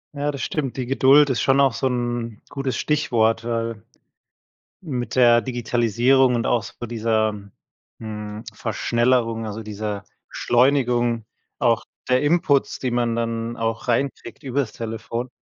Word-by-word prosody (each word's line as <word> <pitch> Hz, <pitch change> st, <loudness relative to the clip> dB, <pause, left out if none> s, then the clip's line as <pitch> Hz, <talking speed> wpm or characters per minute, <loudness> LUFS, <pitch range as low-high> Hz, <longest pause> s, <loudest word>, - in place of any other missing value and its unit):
Ja, 145 Hz, +1 st, -1 dB
das 140 Hz, -4 st, -4 dB
stimmt, 140 Hz, -5 st, -3 dB
die 130 Hz, -, -2 dB
Geduld 135 Hz, +2 st, +5 dB
ist 120 Hz, -, 0 dB
schon 135 Hz, +1 st, +3 dB
auch 135 Hz, -3 st, +4 dB
so 130 Hz, -, 0 dB
'n 120 Hz, -3 st, -2 dB
gutes 135 Hz, -2 st, -3 dB
Stichwort, 115 Hz, -7 st, +1 dB
weil 115 Hz, -2 st, -3 dB, 1.0 s
mit 130 Hz, -10 st, -4 dB
der 120 Hz, -2 st, +6 dB
Digitalisierung 120 Hz, +2 st, +2 dB
und 115 Hz, -, -1 dB
auch 120 Hz, -, +2 dB
so 120 Hz, -, -8 dB
dieser, 110 Hz, -2 st, 0 dB, 0.6 s
hm, 105 Hz, -1 st, -7 dB
Verschnellerung, 115 Hz, 0 st, 0 dB
also, 110 Hz, +1 st, -6 dB
dieser 105 Hz, -1 st, -5 dB, 0.2 s
Beschleunigung 120 Hz, -3 st, +2 dB, 0.3 s
auch 115 Hz, -1 st, +2 dB, 0.3 s
der 125 Hz, +1 st, +3 dB
Inputs, 150 Hz, -2 st, +2 dB
die 130 Hz, -2 st, -2 dB
man 120 Hz, -1 st, 0 dB
dann 115 Hz, 0 st, -2 dB
auch 115 Hz, +1 st, -3 dB
reinkriegt 120 Hz, 0 st, -2 dB
über 135 Hz, +1 st, 0 dB
das 125 Hz, -6 st, -2 dB
Telefon, 115 Hz, +2 st, -5 dB
120 Hz, 140 wpm, -22 LUFS, 115-130 Hz, 1.0 s, der